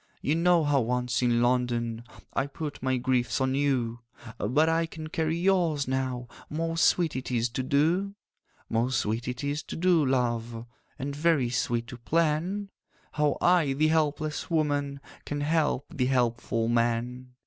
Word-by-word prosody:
'You 145 - 0
know 170 0 +3
how 145 -2 +2
once 125 +1 0
in 120 -1 +2
London 120 -2 0 0.3
I 135 - 0
put 145 +1 -6
my 130 0 +1
griefs 125 0 0
on 130 0 +1
you; 130 -4 0 0.4
But 145 +9 +2
I 165 0 +1
can 155 -1 -8
carry 160 0 -1
yours 170 -6 +2
now— 130 -2 -2 0.2
Most 165 +1 0
sweet 170 -4 +2
it 130 - -4
is 120 -1 0
to 130 +3 -3
do! 165 +9 +1 0.5
'Most 120 +2 +1
sweet 115 +3 -2
it 125 +1 -4
is 145 +2 -1
to - - -8
do, 175 -2 +3
love, 120 -3 -1 0.3
And 140 0 -4
very 150 -5 +2
sweet 120 -1 0
to 125 0 -9
plan 170 - 0 0.4
How 150 -1 +1
I, 175 -6 +4
the 155 +3 +2
helpless 155 0 0
woman, 145 -3 0 0.2
Can 145 0 -4
help 150 -2 +1
the 130 -5 0
helpful 120 -3 0
man. 120 +2 -1
135 Hz, 160 wpm, -28 LUFS, 125-155 Hz, 0.5 s, I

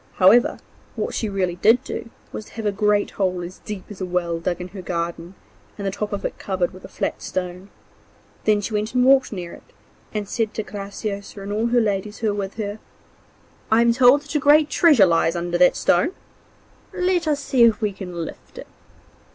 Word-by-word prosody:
However, 205 +6 +5 0.4
what - - -3
she 220 - -2
really 185 -3 -1
did 225 +7 +4
do 230 - -6 0.2
was 215 - -6
to - - -17
have 225 -1 -6
a 205 - +2
great 205 0 +1
hole 185 -2 -1
as 175 +2 -9
deep 205 -3 -7
as 200 - -9
a - - -1
well 175 -2 -1
dug 175 +1 -2
in 180 0 -6
her 190 +1 -8
garden, 170 0 -4 0.4
and 200 - -5
the 195 - 0
top 210 +2 -4
of 200 - -4
it - - -4
covered 185 -3 -1
with 185 - -13
a - - -8
flat - - -3
stone. 180 +1 -5 0.8
Then 210 -1 +3
she 210 +2 -5
went 215 +3 -2
and 250 0 +4
walked 270 0 +5
near 180 -4 -6
it, - - -12 0.5
and 210 -2 -3
said 220 0 -2
to 220 - -2
Graciosa 200 0 -6
and 200 +1 -4
all 220 +3 0
her 240 +1 +3
ladies 205 -1 -1
who 220 - 0
were 205 0 -2
with 195 0 -4
her: 210 -1 -4 0.9
'I 225 +1 +5
am 235 0 +4
told 255 +4 +5
that 290 - -9
a 300 - +2
great 295 +2 +5
treasure 295 - +6
lies 165 -1 +2
under 175 0 -2
that 180 - +5
stone; 180 - +2 0.8
let 360 -2 0
us 295 -2 +1
see 270 -3 0
if 225 -1 +3
we 210 -3 -1
can 180 -3 -6
lift - - -12
it. - - -8
205 Hz, 215 wpm, -22 LUFS, 185-230 Hz, 0.9 s, treasure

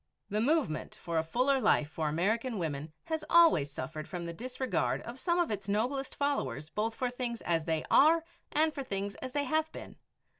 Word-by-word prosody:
The 210 +1 +1
movement 280 - 0
for 170 -2 -2
a - - 0
fuller 255 +10 +2
life 150 - +3
for 155 -2 -1
American 220 - 0
women 155 -3 -3
has 320 -1 -3
always 330 - +6
suffered 155 +1 -6
from 175 -2 -4
the 170 - -4
disregard 255 +5 -1
of 240 +2 -8
some 345 +3 +1
of 345 -6 +1
its 200 -1 -4
noblest 255 +7 -1
followers, 155 - -1
both 220 +4 -1
for 250 -1 -1
things 245 -2 -3
as 165 -2 0
they 160 -2 -1
are 325 +3 +6 0.3
and 310 +1 +2
for 280 - -4
things 200 -3 -3
as 255 0 -5
they 290 - +1
have 315 +3 0
been. - - -10
230 Hz, 195 wpm, -31 LUFS, 165-280 Hz, 0.3 s, always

